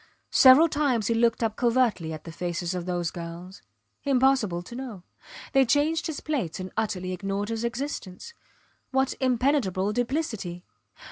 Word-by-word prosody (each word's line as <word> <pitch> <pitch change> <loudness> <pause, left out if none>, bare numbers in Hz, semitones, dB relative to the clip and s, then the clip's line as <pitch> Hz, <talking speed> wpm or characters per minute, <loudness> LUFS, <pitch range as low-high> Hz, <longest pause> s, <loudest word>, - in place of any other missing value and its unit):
Several 265 +5 +8
times 280 -8 0
he 230 - +2
looked 230 0 +2
up 220 -1 0
covertly 235 -9 +1
at 155 -1 -7
the 165 - -8
faces 175 +1 -3
of 180 -1 -4
those 175 -2 -1
girls. 175 +2 -8 0.4
Impossible 255 -10 +2
to 205 - -11
know. 240 -8 -7 0.5
They 270 0 +6
changed 295 +5 +1
his 315 -3 -5
plates 250 - -2
and 185 0 -6
utterly 185 -4 -2
ignored 200 +2 -3
his 225 0 -3
existence. 235 - -5 0.6
What 265 0 +1
impenetrable 245 -7 +1
duplicity. 235 - -2
225 Hz, 145 wpm, -26 LUFS, 180-265 Hz, 0.6 s, Several